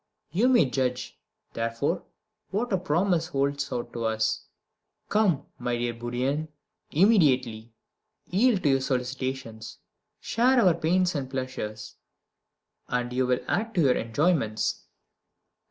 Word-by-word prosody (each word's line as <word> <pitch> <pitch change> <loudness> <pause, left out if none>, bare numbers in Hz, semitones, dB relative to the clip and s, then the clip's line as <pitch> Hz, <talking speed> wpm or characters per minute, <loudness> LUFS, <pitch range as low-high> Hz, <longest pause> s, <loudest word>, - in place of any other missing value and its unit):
You 205 +10 +3
may 245 - +5
judge, 125 -1 -2 0.3
therefore, 115 +8 -1 0.5
what 220 +3 -1
a - - +4
promise 175 0 +1
it - - -18
holds 140 0 0
out 120 -2 -4
to 115 -1 -3
us. 110 0 0 0.6
Come, 195 -10 +2
my 120 -1 -1
dear 120 0 -1
Bourrienne, 125 +6 -2 0.4
immediately 130 - +3 0.5
yield 210 +1 +2
to 140 - +4
our 135 - +3
solicitations 130 -3 -3 0.4
share 250 +4 +3
our 185 -7 +5
pains 175 +2 +1
and 135 -4 -3
pleasures, 120 -5 -5 0.9
and 125 0 -2
you 130 0 +1
will 125 0 +1
add 225 +1 -1
to 160 -7 +4
our - - +5
enjoyments. 115 -2 0
135 Hz, 125 wpm, -27 LUFS, 120-175 Hz, 0.9 s, may